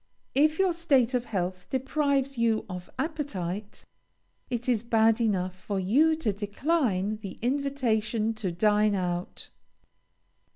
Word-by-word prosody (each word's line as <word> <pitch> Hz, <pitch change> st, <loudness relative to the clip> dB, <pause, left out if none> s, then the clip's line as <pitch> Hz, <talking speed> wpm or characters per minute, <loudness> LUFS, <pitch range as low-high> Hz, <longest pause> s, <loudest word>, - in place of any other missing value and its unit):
If 305 Hz, +3 st, +3 dB
your 380 Hz, -2 st, +3 dB
state 275 Hz, -8 st, +2 dB
of 245 Hz, -1 st, 0 dB
health 185 Hz, -3 st, -3 dB
deprives 275 Hz, 0 st, 0 dB
you 230 Hz, -2 st, +1 dB
of 180 Hz, -2 st, -7 dB
appetite, 210 Hz, -, -4 dB, 0.6 s
it 240 Hz, 0 st, -3 dB
is 240 Hz, -4 st, +2 dB
bad 225 Hz, 0 st, +3 dB
enough 185 Hz, -5 st, 0 dB
for 195 Hz, +1 st, -4 dB
you 280 Hz, +13 st, +3 dB
to 290 Hz, -10 st, -1 dB
decline 210 Hz, -, 0 dB
the 205 Hz, -3 st, -8 dB
invitation 235 Hz, -5 st, 0 dB
to 210 Hz, -4 st, -3 dB
dine 210 Hz, +3 st, +3 dB
out. 180 Hz, -1 st, -3 dB
225 Hz, 125 wpm, -28 LUFS, 200-275 Hz, 0.6 s, If